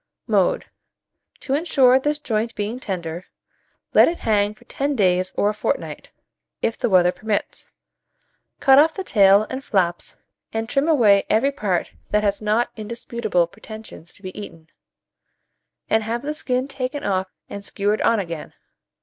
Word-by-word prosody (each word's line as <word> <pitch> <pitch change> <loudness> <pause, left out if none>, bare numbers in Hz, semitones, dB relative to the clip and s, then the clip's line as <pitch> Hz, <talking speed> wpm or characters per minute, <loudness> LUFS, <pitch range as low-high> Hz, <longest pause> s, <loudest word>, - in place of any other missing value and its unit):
Mode. - - +2 0.8
To 270 - -3
insure 275 -5 +4
this 295 +2 0
joint 230 -5 -2
being 210 +4 -3
tender, 175 -5 -5 0.7
let - - +7
it 340 - -2
hang 210 -1 +1
for - - -21
ten 280 +1 -2
days 185 -4 +2
or 205 - +3
a - - -1
fortnight, 210 - -3 0.5
if 230 - -1
the 240 - -1
weather 180 -2 +5
permits. 215 +2 -3 0.9
Cut 270 0 +6
off 315 +2 +4
the 385 - -4
tail 200 - +5
and 260 +1 -4
flaps 175 -6 -1 0.3
and 225 0 -2
trim 275 +5 +1
away 220 -11 +4
every 240 +6 +3
part 200 -10 -1 0.2
that 210 0 +1
has 205 0 0
not 215 +3 +1
indisputable 220 -4 -1
pretensions 215 -2 -12
to 205 - -13
be 185 0 -7
eaten, 165 -6 -10 1.2
and 220 - +2
have 230 +3 -3
the 300 +1 -2
skin 255 -3 -1
taken 275 +1 -4
off 190 -1 0 0.2
and 200 - -8
skewered 205 +1 -1
on 230 -1 +3
again. 170 -5 -6
215 Hz, 155 wpm, -22 LUFS, 200-255 Hz, 1.2 s, let